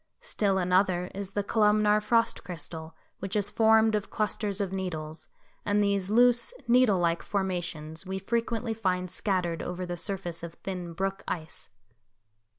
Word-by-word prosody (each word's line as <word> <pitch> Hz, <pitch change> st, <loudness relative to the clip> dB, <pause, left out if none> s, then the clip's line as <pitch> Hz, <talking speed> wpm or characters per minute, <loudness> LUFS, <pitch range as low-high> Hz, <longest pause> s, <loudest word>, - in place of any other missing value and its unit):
Still 195 Hz, -2 st, 0 dB
another 180 Hz, 0 st, +2 dB
is 195 Hz, 0 st, -6 dB
the 205 Hz, -, 0 dB
columnar 210 Hz, 0 st, +3 dB
frost 230 Hz, +2 st, +1 dB
crystal, 160 Hz, -2 st, -7 dB, 0.2 s
which 195 Hz, +2 st, -4 dB
is 205 Hz, -1 st, +1 dB
formed 220 Hz, 0 st, +5 dB
of 210 Hz, -2 st, -1 dB
clusters 210 Hz, -1 st, -1 dB
of 195 Hz, -2 st, -2 dB
needles, 160 Hz, -5 st, -4 dB, 0.4 s
and 205 Hz, 0 st, +2 dB
these 200 Hz, -2 st, +1 dB
loose, 245 Hz, -, +4 dB
needle 240 Hz, -4 st, +5 dB
like 170 Hz, -1 st, +1 dB
formations 175 Hz, -5 st, -2 dB
we 190 Hz, 0 st, -4 dB
frequently 230 Hz, +3 st, -1 dB
find 185 Hz, -4 st, -1 dB
scattered 180 Hz, -5 st, -1 dB
over 180 Hz, +1 st, -4 dB
the 175 Hz, 0 st, -4 dB
surface 175 Hz, -2 st, -4 dB
of 170 Hz, 0 st, -7 dB
thin 180 Hz, -3 st, -5 dB
brook 195 Hz, +3 st, -2 dB
ice. 160 Hz, -2 st, -4 dB
195 Hz, 150 wpm, -28 LUFS, 175-210 Hz, 0.4 s, formed